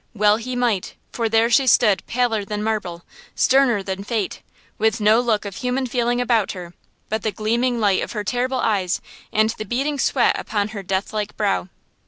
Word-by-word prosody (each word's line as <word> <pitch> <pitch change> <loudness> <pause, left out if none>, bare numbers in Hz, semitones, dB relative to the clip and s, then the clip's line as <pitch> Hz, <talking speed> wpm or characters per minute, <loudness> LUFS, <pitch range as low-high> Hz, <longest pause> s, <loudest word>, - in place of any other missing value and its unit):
Well 210 0 +4
he 250 +2 -5
might, 235 -6 -1 0.2
for 230 -2 -1
there 225 +1 +3
she 265 +3 +4
stood 215 -4 +4
paler 235 -3 0
than 210 +1 -4
marble–sterner 220 - 0
than 190 0 -4
fate–with 220 +1 -3
no 215 +2 +4
look 225 -4 0
of 200 -2 -6
human 255 +1 -1
feeling 245 0 0
about 235 -4 +1
her, 175 -2 -9 0.3
but 220 0 -2
the 215 - -1
gleaming 235 +4 0
light 200 -3 +2
of - - -5
her 210 -2 -3
terrible 255 +4 -1
eyes, 195 -4 0 0.3
and 220 +1 +2
the - - -2
beading 275 +7 -2
sweat - - +2
upon 205 -1 -2
her 210 -2 -6
death 190 +2 -2
like 210 -1 -3
brow. 200 -3 0
220 Hz, 180 wpm, -21 LUFS, 205-245 Hz, 0.3 s, Well